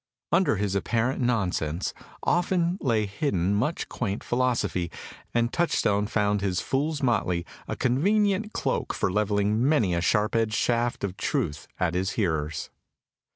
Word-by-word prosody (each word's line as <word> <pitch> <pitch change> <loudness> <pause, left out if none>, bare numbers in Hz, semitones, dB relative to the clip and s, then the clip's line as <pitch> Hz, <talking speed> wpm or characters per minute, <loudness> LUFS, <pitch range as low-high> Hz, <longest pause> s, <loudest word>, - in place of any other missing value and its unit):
Under 170 -8 +3
his 100 -1 -1
apparent 115 +7 0
nonsense 95 -9 0 0.3
often 175 +1 +1
lay 115 -6 +2
hidden 100 - 0
much 125 +11 0
quaint 105 -4 -3
philosophy, 120 -8 0 0.4
and 120 0 +1
Touchstone 105 -11 +1
found 105 -2 +1
his 95 -3 0
fool's 145 +2 -1
motley 90 -8 +1 0.2
a - - -3
convenient 200 - +2
cloak - - -1
for - - 0
levelling 105 +2 +1
many 110 - +3
a 85 - 0
sharp 105 +4 +2
edged 110 -2 +1
shaft 120 +1 0
of 95 -2 -3
truth 75 -6 -2
at 85 -2 +1
his 95 +2 -1
hearers. 80 -7 -1
105 Hz, 140 wpm, -26 LUFS, 95-130 Hz, 0.4 s, Under